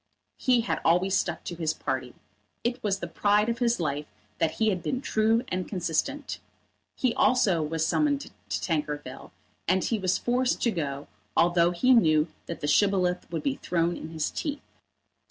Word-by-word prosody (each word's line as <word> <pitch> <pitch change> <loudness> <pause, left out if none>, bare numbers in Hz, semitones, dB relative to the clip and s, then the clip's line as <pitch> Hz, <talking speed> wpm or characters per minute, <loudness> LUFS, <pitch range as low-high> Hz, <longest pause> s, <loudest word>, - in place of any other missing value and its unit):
He 250 -3 +3
had 230 - -2
always 180 +3 +3
stuck - - -1
to - - -5
his 160 -2 -1
party. 130 -2 -3 0.5
It 240 +1 -1
was 200 -2 0
the 175 - -5
pride 205 +6 +2
of 235 0 -2
his 240 -3 +2
life 150 -2 -2 0.3
that 165 -1 +1
he 220 -1 +2
had 185 -4 -1
been 255 +9 -2
true 225 -2 +2
and 185 0 -2
consistent. 205 - -2 0.6
He 255 -3 +1
also 250 -10 +3
was 160 +1 -1
summoned 285 - +1
to - - -10 0.2
Tankerville, 150 -5 -3 0.4
and 185 +1 +2
he 225 - 0
was 185 -2 +1
forced 250 +1 +1
to 235 - +3
go, 145 -6 -3 0.3
although 175 0 +4
he 180 +9 +3
knew 155 -8 +4 0.2
that 170 - -6
the 145 - -2
Shibboleth 180 +1 +2
would 165 - -3
be 275 -1 0
thrown 170 0 0
in 160 - -7
his 160 -1 -2
teeth. 290 -3 -4
185 Hz, 175 wpm, -27 LUFS, 160-235 Hz, 0.6 s, although